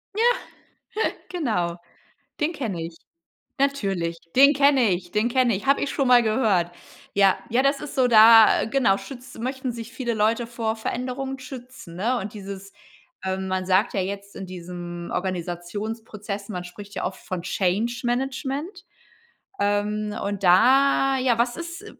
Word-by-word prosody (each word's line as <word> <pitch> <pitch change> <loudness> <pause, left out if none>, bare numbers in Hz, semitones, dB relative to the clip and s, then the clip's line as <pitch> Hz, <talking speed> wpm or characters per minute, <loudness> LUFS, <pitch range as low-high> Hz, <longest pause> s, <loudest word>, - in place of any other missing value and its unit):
Ja, 450 - +1 1.1
genau, 215 - -1 0.6
den 305 +3 +1
kenne 215 - -4
ich. 165 0 -8 0.6
Natürlich, 195 -12 0 0.2
den 280 +3 +7
kenne 275 -5 +4
ich 175 0 -3
dene 215 +3 +1
kenn 255 0 +2
ich, 205 +5 -2
habe 275 - +4
ich 285 - -1
schon 275 -2 0
mal 245 -1 +6
gehört. 210 -6 +1 0.4
Ja, 195 -1 +4
ja 245 +3 +3
das 275 0 +2
ist 295 - -7
so 255 -2 +4
da 225 -1 +7
genau 230 -5 +2
schütz 255 +1 -10
möchten 260 +2 -3
sich 230 0 -8
viele 240 -3 -2
Leute 225 +3 +1
vor 230 -2 -2
Veränderungen 255 +4 -4
schützen, 255 -8 -10
ne? 235 +7 0
Und 205 +2 -6
dieses 200 -1 -8 0.5
ähm, 190 0 -2
man 185 0 -1
sagt 190 +4 +2
ja 195 - 0
jetzt 200 +1 -6
in 195 - -7
diesem 175 -1 -7
Organisationsprozess 200 +4 -4
man 180 -3 -4
spricht 200 +3 -11
ja - - -2
oft 185 +1 -5
von 180 -2 -5
Change 210 +7 -1
Management, 270 - -3 0.7
ähm, 210 +1 0
und 200 -1 -3
da 270 +8 +5
ja, 250 -3 +2
was 240 +1 +1
ist 340 +4 -7
220 Hz, 155 wpm, -24 LUFS, 190-260 Hz, 1.1 s, den